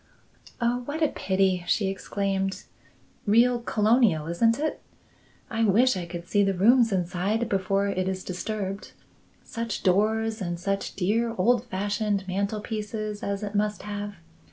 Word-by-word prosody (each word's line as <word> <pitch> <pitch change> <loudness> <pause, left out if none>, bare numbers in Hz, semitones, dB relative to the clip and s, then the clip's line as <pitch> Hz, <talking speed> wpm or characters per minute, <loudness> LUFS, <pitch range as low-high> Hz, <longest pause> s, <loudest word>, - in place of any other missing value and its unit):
"Oh, 240 0 +1
what 310 +4 -2
a 305 - +4
pity!" 190 -2 +1
she 210 - +2
exclaimed. 195 0 -2 0.6
"Real 240 +3 +4
colonial, 215 -7 +3
isn't 225 +8 +2
it! 310 +1 -2 0.7
I 225 -1 -1
wish 225 +4 +4
I 175 -2 -4
could 170 0 -7
see 205 +2 +3
the 195 -1 +1
rooms 230 +5 +5
inside 190 +5 0
before 195 -1 +1
it 185 -2 -1
is 190 -1 -4
disturbed. 195 +1 -4 0.5
Such 230 -2 -4
doors 220 +3 +2
and 175 -2 -3
such 195 +2 -2
dear 225 +5 0
old 240 +5 +3
fashioned 205 -1 -1
mantelpieces 210 +2 -3
as 200 +1 -3
it 205 0 -4
must 210 0 0
have! 205 0 -5
205 Hz, 140 wpm, -26 LUFS, 190-225 Hz, 0.7 s, rooms